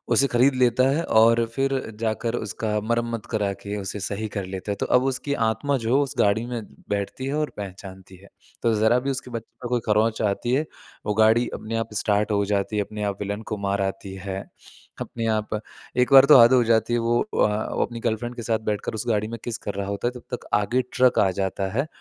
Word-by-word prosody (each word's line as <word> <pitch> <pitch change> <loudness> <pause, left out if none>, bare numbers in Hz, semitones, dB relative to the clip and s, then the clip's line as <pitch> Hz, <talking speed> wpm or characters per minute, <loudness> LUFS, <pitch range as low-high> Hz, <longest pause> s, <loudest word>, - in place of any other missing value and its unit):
उसे 140 +4 +4
ख़रीद 130 +2 +3
लेता 125 0 +3
है 155 +5 +1 0.2
और 115 +1 +5
फिर 135 0 +1 0.3
जाकर 115 +1 -1
उसका 105 -1 -2
मरम्मत 115 0 -2
करा 105 -3 0
के 100 0 -5
उसे 100 +1 -5
सही 105 +3 -3
कर 100 -2 -2
लेता 95 +2 -5
है। - - -1
तो - - +1
अब 125 - +1
उसकी 135 +2 -1
आत्मा 130 +6 0
जो 130 +5 +3
उस 135 - -5
गाड़ी 105 +3 +3
में 120 -2 -4 0.3
बैठती 100 +6 -3
है 140 - -2
और 150 0 0
पहचानती 95 -1 -9
है। 100 +2 -18 0.3
तो 115 -2 +3
ज़रा 110 +3 +3
भी 135 +2 -2
उसके 130 -1 -6
बच्चे 115 -1 -7
को 120 - -4
कोई 125 -1 +1
खरोंच 110 +1 +2
आती 110 +4 0
है, 150 +4 +2 0.4
वो 105 - 0
गाड़ी 110 +2 +4
अपने 115 +1 -5
आप 115 -1 -3
स्टार्ट 105 +1 +1
हो 100 0 +2
जाती 100 +1 -1
है, 105 - +2
अपने 105 +1 -6
आप 100 -1 -2
विलेन 100 +1 -3
को 105 - -2
मार 100 0 0
आती 95 0 -3
है, 95 -1 -3 0.6
अपने 115 - -4
आप 105 0 -3 0.4
एक 125 +2 +3
बार 135 0 +10
तो 140 -3 +8
हद 120 +2 +7
हो 125 -1 +5
जाती 115 +1 +2
है, 120 - +2
वो 115 +1 +1
अ, 110 - 0
वो - - +1
अपनी 115 -1 -8
गर्लफ्रेंड 120 +2 -2
के 120 - -6
साथ 110 0 0
बैठकर 105 - -3
उस 110 +3 -5
गाड़ी 105 -1 +1
में 115 -1 -6
किस 120 -2 -4
कर 100 - -1
रहा 100 0 -3
होता 100 +4 -2
है, - - -8
तब - - -20
तक - - -13
आगे 125 +5 +1
ट्रक 130 -1 +4
आ 95 - +4
जाता 95 0 -1
है 140 +3 +1
110 Hz, 235 wpm, -24 LUFS, 105-120 Hz, 0.6 s, बार